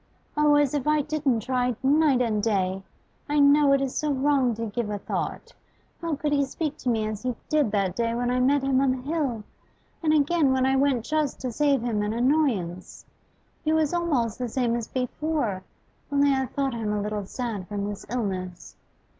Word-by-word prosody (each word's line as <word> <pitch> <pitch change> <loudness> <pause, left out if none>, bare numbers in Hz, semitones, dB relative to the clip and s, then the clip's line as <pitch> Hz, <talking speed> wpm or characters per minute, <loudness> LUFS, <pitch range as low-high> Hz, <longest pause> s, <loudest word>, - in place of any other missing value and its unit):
'Oh, 295 0 +4
as 290 -2 +3
if 290 -1 -2
I 305 0 +3
didn't 285 -6 0
try 250 0 0
night 280 -2 +4
and 215 -3 0
day! 195 -3 0 0.5
I 295 - +1
know 285 0 +5
it 275 - +3
is 270 -2 -2
so 300 -1 0
wrong 270 -3 +2
to 230 +1 -4
give 220 0 -3
a 205 - -2
thought. - - -4 0.5
How 335 -2 -1
could 295 +1 -2
he 280 -1 +3
speak 300 +2 -3
to 255 - -2
me 220 -2 +1
as 215 -1 -4
he 250 -1 -2
did 300 -6 +2
that 195 -3 0
day 230 -1 0
when 245 +1 0
I 250 - +1
met 270 +2 +3
him 270 -1 +2
on 275 - +3
the 255 0 -1
hill, 275 -7 -2 0.6
and 315 -2 +2
again 300 -1 +3
when 260 0 +2
I 265 0 +2
went 265 -4 +1
just 305 -3 -1
to 255 -2 -3
save 280 0 +1
him 225 -4 0
an 210 +1 -1
annoyance? 235 - 0 0.6
He 310 - +1
was 315 0 +1
almost 275 -11 0
the 250 -1 -2
same 235 -1 0
as 235 -2 -3
before, 255 -5 -2 0.5
only 285 0 +3
I 265 -1 0
thought 275 -1 -2
him 225 -3 -2
a 210 -1 -1
little 210 -2 -3
sad 220 -7 -4
from 205 -1 -3
his 205 -1 -6
illness. 190 -7 -4
255 Hz, 205 wpm, -25 LUFS, 225-290 Hz, 0.6 s, know